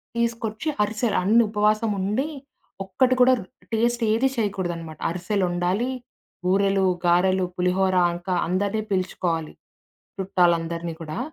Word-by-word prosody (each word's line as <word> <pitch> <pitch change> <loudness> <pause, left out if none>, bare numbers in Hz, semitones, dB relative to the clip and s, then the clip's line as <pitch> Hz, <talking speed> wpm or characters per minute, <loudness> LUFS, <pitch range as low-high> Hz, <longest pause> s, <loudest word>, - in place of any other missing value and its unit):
తీసుకొచ్చి 230 +2 -2 0.2
అరిసెలు 215 +1 -1
అన్నీ 225 +5 +5
ఉపవాసం 215 +1 +1
ఉండి, 215 +10 0 0.6
ఒక్కటి 255 +7 +2
కూడా 255 +1 +7 0.4
టేస్ట్ 235 +1 +1
ఏదీ 240 +5 +3
చేయకూడదనమాట. 175 -7 -3
అరిసెలు 185 +2 -1
ఒండాలి. 180 +8 0 0.6
బూరెలు, 195 +1 +2 0.2
గారెలు, 185 +2 +3
పులిహోర. 185 +1 +1 0.2
ఇంకా 175 +1 -4
అందరినీ 200 +4 0
పిలుచుకోవాలి, 175 -4 -1 0.7
చుట్టాలందరినీ 170 -3 +1
కూడా. 155 +2 -6
190 Hz, 105 wpm, -24 LUFS, 180-220 Hz, 0.7 s, కూడా